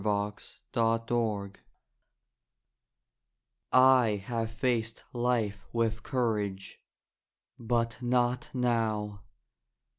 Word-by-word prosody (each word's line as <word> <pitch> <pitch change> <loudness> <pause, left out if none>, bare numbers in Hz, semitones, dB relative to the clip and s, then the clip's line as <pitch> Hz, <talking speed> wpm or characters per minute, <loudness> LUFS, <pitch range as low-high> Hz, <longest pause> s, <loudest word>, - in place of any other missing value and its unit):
In 105 0 0 0.4
Darkness 115 -3 0 2.1
I 130 -6 +5
have 115 -1 -2
faced 115 -2 -1
life 120 -5 0
with 115 -1 0
courage, 105 -7 -2 0.8
but 115 0 -1
not 125 0 +1
now! 110 -5 0
115 Hz, 65 wpm, -30 LUFS, 105-120 Hz, 2.1 s, I